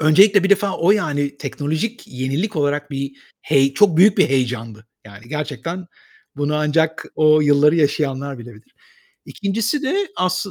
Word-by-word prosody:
öncelikle 195 Hz, +6 st, +5 dB
bir 195 Hz, -, 0 dB
defa 200 Hz, -1 st, +2 dB
o 175 Hz, +4 st, +2 dB
yani 145 Hz, -8 st, 0 dB
teknolojik 160 Hz, +11 st, -4 dB
yenilik 135 Hz, +10 st, -3 dB
olarak 145 Hz, 0 st, -1 dB
bir 140 Hz, 0 st, -4 dB, 0.3 s
hey 135 Hz, -2 st, +2 dB
çok 200 Hz, -6 st, +4 dB
büyük 195 Hz, +3 st, +5 dB
bir -, -, +4 dB
heyecandı. 115 Hz, -4 st, -3 dB, 0.2 s
Yani 105 Hz, +2 st, -14 dB
gerçekten 150 Hz, +4 st, -5 dB, 0.5 s
bunu 145 Hz, +1 st, -1 dB
ancak 160 Hz, +1 st, 0 dB
o 155 Hz, 0 st, +4 dB
yılları 150 Hz, +2 st, +4 dB
yaşayanlar 140 Hz, -3 st, -1 dB
bilebilir. 115 Hz, -2 st, -14 dB, 0.5 s
2'ncisi 225 Hz, +8 st, -2 dB
de 380 Hz, +7 st, -1 dB
asl 185 Hz, +2 st, -1 dB
150 Hz, 145 wpm, -19 LUFS, 140-185 Hz, 0.5 s, öncelikle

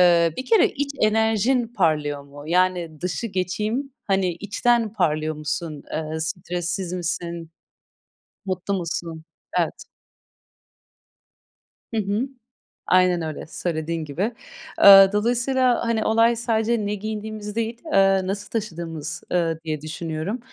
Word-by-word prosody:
ııı, 170 Hz, -2 st, +5 dB
bir 255 Hz, -, -4 dB
kere 450 Hz, -5 st, +5 dB
iç 285 Hz, 0 st, -3 dB
enerjin 220 Hz, +3 st, +2 dB
parlıyor 155 Hz, -9 st, 0 dB
mu? 140 Hz, +1 st, -12 dB
Yani, 175 Hz, -2 st, +1 dB
dışı 180 Hz, +6 st, -2 dB
geçeyim, 215 Hz, +7 st, -2 dB
hani, 190 Hz, -2 st, +1 dB
içten 215 Hz, +5 st, +1 dB
parlıyor 155 Hz, -6 st, 0 dB
musun? 150 Hz, 0 st, -4 dB
Eee, 155 Hz, 0 st, -3 dB
stressiz 175 Hz, +2 st, -3 dB
misin? 170 Hz, -2 st, -3 dB, 0.9 s
Mutlu 190 Hz, +1 st, -2 dB
musun? 165 Hz, -3 st, -4 dB, 0.3 s
Evet. -, -, -1 dB, 2.1 s
Hı 220 Hz, -, +2 dB
hı, 210 Hz, +6 st, -1 dB, 0.6 s
aynen 185 Hz, -1 st, +4 dB
öyle, 155 Hz, -2 st, -5 dB
söylediğin 160 Hz, -1 st, -3 dB
gibi. 180 Hz, -, -2 dB, 0.5 s
Eee, 195 Hz, -1 st, +11 dB
dolayısıyla, 245 Hz, +3 st, +2 dB
hani, 225 Hz, -1 st, +1 dB
olay 230 Hz, +1 st, +4 dB
sadece 225 Hz, -1 st, 0 dB
ne 205 Hz, +1 st, -1 dB
giydiğimiz 215 Hz, 0 st, -5 dB
değil, 230 Hz, +1 st, -2 dB
eee, 195 Hz, -1 st, +4 dB
nasıl 200 Hz, +1 st, -4 dB
taşıdığımız, 165 Hz, -8 st, -4 dB
ııı, 165 Hz, -2 st, +1 dB
diye 155 Hz, -2 st, -3 dB
düşünüyorum. 160 Hz, +6 st, -4 dB
185 Hz, 115 wpm, -23 LUFS, 165-220 Hz, 2.1 s, Eee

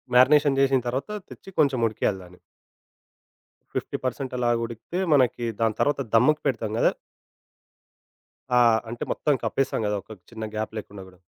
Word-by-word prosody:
Marination 140 Hz, +2 st, +5 dB
చేసిన 135 Hz, -1 st, +4 dB
తర్వాత 130 Hz, -, -3 dB, 0.2 s
తెచ్చి -, -, -12 dB
కొంచెం 140 Hz, -4 st, +3 dB
ఉడికియాలి 105 Hz, -2 st, -1 dB
దాన్ని. 90 Hz, 0 st, -16 dB, 1.4 s
50% -, -, -2 dB
పర్సెంట్ 130 Hz, 0 st, -3 dB
అలాగా 120 Hz, -1 st, +1 dB
ఉడికితే, 115 Hz, -, -6 dB
మనకి 125 Hz, -3 st, +2 dB, 0.2 s
దాని 110 Hz, -1 st, +1 dB
తర్వాత 145 Hz, -1 st, +1 dB
దమ్ముకి 150 Hz, +7 st, +4 dB
పెడతాం 115 Hz, -5 st, -2 dB
గదా! -, -, +4 dB, 1.7 s
ఆ! -, -, +7 dB, 0.3 s
అంటే 120 Hz, +1 st, -5 dB
మొత్తం 150 Hz, -, +1 dB
కప్పేసాం 135 Hz, -3 st, 0 dB
గదా! 105 Hz, 0 st, 0 dB
ఒక 110 Hz, -, -16 dB, 0.2 s
చిన్న 110 Hz, -1 st, -7 dB
గ్యాప్ 110 Hz, 0 st, -3 dB
లేకుండా 100 Hz, -2 st, -8 dB
గూడా. 90 Hz, -1 st, -18 dB
120 Hz, 145 wpm, -25 LUFS, 110-135 Hz, 1.7 s, ఆ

